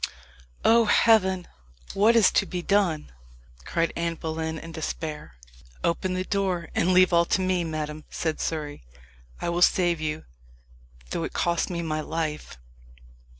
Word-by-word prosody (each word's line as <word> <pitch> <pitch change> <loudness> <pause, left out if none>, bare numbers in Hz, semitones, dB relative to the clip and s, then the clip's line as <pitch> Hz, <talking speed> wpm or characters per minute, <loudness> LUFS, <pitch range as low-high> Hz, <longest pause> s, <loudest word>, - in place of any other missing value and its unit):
"Oh, 230 0 +6
heaven! 190 -4 +3 0.5
what 215 +4 +4
is 225 -4 +6
to - - +2
be 180 -2 -4
done?" 190 -7 +1 0.5
cried 165 -1 0
Anne 170 0 -1
Boleyn, 160 0 -4
in 165 +1 -9
despair. 155 - -5 0.5
"Open 185 +2 0
the 185 - -1
door, 185 -3 -1
and 180 - +2
leave 185 0 +5
all 170 0 +5
to 190 - +1
me, 185 -1 +1
madam," 155 -1 -4
said 160 -2 -3
Surrey; 150 - -4 0.6
"I - - -2
will 170 +1 -1
save 175 -2 +3
you, 155 0 -3 0.9
though - - -2
it - - -5
cost 170 +1 0
me 170 -2 -3
my 155 -1 -2
life!" 155 - -4
170 Hz, 150 wpm, -26 LUFS, 160-185 Hz, 0.9 s, Oh